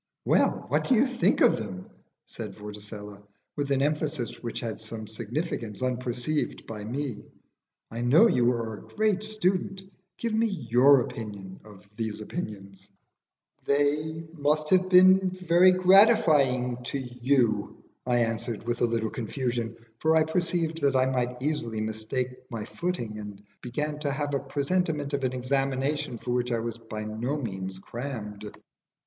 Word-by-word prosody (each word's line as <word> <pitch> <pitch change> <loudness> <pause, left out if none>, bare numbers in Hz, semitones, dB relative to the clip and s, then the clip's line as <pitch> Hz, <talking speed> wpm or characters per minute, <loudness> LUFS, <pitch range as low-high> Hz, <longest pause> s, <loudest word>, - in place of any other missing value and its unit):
"Well, - - +2
what - - +1
do 260 - +6
you 240 +4 +5
think 255 -2 +1
of - - +6
them?" 95 -4 -6 0.4
said - - -8
Vorticella, 105 -1 -9 0.3
with 145 -1 -2
an 135 -1 +2
emphasis 150 -4 -2
which 120 - -4
had 115 -2 -5
some 110 0 -6
significance 115 - -4
unperceived 125 +3 -2
by 105 -2 -7
me. 125 0 -4 0.7
"I 115 +1 -4
know 135 - +6
you 125 - +4
are 115 -2 -3
a 105 - -9
great 215 -2 0
student. 195 -2 -1 0.4
Give 230 -2 -2
me 225 +1 +3
your 140 - +4
opinion 100 -5 -7
of 105 -2 -15
these 110 -2 -3
opinions." 100 - -7 0.8
"They 150 +3 +1
must 150 0 0 0.2
be 180 -1 +8
very 185 -1 +4
gratifying 170 - +4
to 140 - -2
you," 125 -4 0 0.2
I 120 -1 +2
answered 115 0 -2
with 120 0 -2
a - - +5
little 115 -2 -1
confusion, 120 -1 -3 0.2
for 160 +1 +3
I 160 - +5
perceived 165 0 -1
that 140 -1 +2
I 130 0 +4
might 125 -1 -1
easily 140 -7 -1
mistake 110 +4 -3
my 115 -3 -5
footing, 120 -13 -3
and 105 -1 -8
I 105 - -35
began 150 +5 -3
to 145 -1 -1
have 145 +1 -2
a 140 - +2
presentiment 145 +1 -1
of 140 -1 -1
an 130 - -1
examination 135 +1 -1
for 120 - -5
which 125 0 0
I 120 - +2
was 115 0 -4
by 110 -2 -6
no 115 +7 -2
means 95 -7 -4
crammed. 105 -2 -6
125 Hz, 155 wpm, -27 LUFS, 110-150 Hz, 0.8 s, be